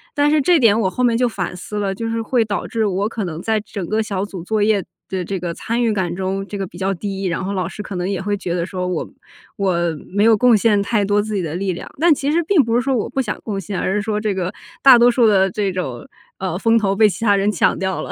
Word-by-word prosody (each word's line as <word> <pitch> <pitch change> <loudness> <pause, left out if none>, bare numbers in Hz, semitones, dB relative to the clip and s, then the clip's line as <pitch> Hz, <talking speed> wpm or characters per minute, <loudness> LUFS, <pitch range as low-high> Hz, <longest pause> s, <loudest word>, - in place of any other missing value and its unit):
但 290 0 +3
是 305 -1 +3
这 345 +5 +4
点 225 -6 +4
我 190 - +1
后 250 - -2
面 235 -2 +3
就 250 +1 +2
反 185 -5 -4
思 195 +4 -7
了， 200 -2 -1
就 225 +4 -4
是 230 0 -1
会 235 +1 +1
导 205 -1 -3
致 225 -3 -1
我 200 +1 0
可 225 -3 -4
能 165 -2 -5
在 220 +1 0
整 205 -3 -6
个 215 +4 0
小 200 -3 -2
组 190 -4 -8
作 215 +3 -1
业 210 -2 +2 0.2
的 190 -1 -3
这 195 +1 -3
个 175 -1 -4
参 235 +2 -2
与 230 -2 +2
感 180 -4 -2
中 190 +1 -2
这 205 - -6
个 195 -1 -3
比 175 - -13
较 190 +1 0
低， 195 +1 -5
然 180 +1 -1
后 195 +2 -3
老 185 -3 -1
师 210 - -7
可 205 - -7
能 180 0 -2
也 195 -3 -2
会 205 +1 -1
觉 180 -3 -4
得 170 -1 -1
说 180 -1 -4
我 180 -3 -3 0.5
我 190 -3 0 0.3
没 200 +3 +1
有 225 0 +6
贡 245 +2 +5
献 210 -1 +3
太 210 0 +1
多 205 +1 +2
自 215 +1 -5
己 195 - 0
的 165 -2 -4
力 190 +1 -1
量， 175 - -8
但 335 +1 +5
其 285 0 -1
实 340 +2 +2
并 330 -3 +4
不 230 -1 -1
是 240 - +3
说 270 +1 0
我 225 - -1
不 270 - -1
想 215 -5 -4
贡 205 -3 -3
献， 195 0 -4
而 190 - -1
是 210 - +1
说 210 0 -2
这 210 -1 -1
个 185 0 -2 0.3
大 260 -3 +9
多 240 +1 +6
数 245 -1 +3
的 195 -3 +4
这 200 +1 -1
种， 135 -10 -5 0.3
呃， 185 -2 -2
风 230 +2 +3
头 200 -3 +1
被 215 +1 +5
其 205 - -6
他 205 -2 +5
人 200 +1 +1
抢 185 - +2
掉 190 0 -2
了。 - - -6
205 Hz, 315 characters per minute, -19 LUFS, 190-225 Hz, 0.5 s, 大